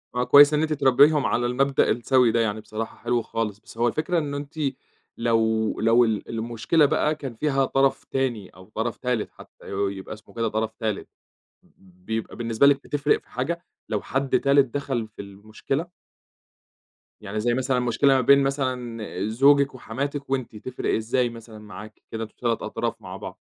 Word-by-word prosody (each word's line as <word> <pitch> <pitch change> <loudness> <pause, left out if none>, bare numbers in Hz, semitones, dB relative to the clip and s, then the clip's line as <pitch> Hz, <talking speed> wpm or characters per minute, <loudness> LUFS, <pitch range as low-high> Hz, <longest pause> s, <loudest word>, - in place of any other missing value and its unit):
آه، 125 - +1
كويس 145 +3 +7
إن 150 - +2
أنتِ 155 -1 0
تربيهم 140 +1 +4
على 120 - +1
المبدأ 135 +3 +2
السَّوِي 125 0 +3
ده 115 - +1
يعني 110 -1 0
بصراحة 110 +1 -6
حلو 120 0 0
خالص. 110 -3 -3
بس 110 - -16
هو 120 +1 +2
الفكرة 155 +8 0
إنّه 145 -2 -3
أنتِ 145 0 -8 0.6
لو 110 -1 +1
لو 115 +2 +5
ال 110 -2 -2
المشكلة 115 +7 +1
بقى 150 +2 +1
كان 135 -5 -7
فيها 135 +1 +1
طرف 135 +1 +1
تاني 120 -8 -2
أو 95 +2 -17
طرف 115 +1 -2
تالت، 125 -4 -2
حتّى - - -17
ي - - -8 0.3
يبقى 95 - -7
اسمه 105 0 -15
كده 115 -1 0
طرف 110 +1 -2
تالت 110 -3 -2 0.6
ب 90 -1 -25
بيبقى 110 0 -4
بالنسبة 115 +2 +2
لِك 140 0 +4
بتفرق 145 0 +1
في - - -30
حاجة 170 +8 -3 0.2
لو 105 -2 -2
حد 135 -2 0
تالت 140 -2 +3
دَخَل 135 -5 -2
في 105 - -10
المشكلة؟ 110 - -5 1.3
يعني 105 +1 -4
زي 120 +2 +1
مثلًا 130 +1 0
مشكلة 125 +3 +3
ما 130 - +3
بين 140 +3 +5
مثلًا 125 -5 -2 0.2
زوجِك 140 +3 +4
وحماتِك 140 +4 -4
وأنتِ، 130 -4 -2
تفرق 125 +4 -3
إزاي 120 +3 0
مثلًا 115 -2 -11
معاكِ؟ 105 0 -11
كده 115 0 -3
أنتم 110 - -10
3 120 -2 0
أطراف - - -3
مع - - -8
بعض. - - -8
120 Hz, 180 wpm, -24 LUFS, 110-140 Hz, 1.3 s, كويس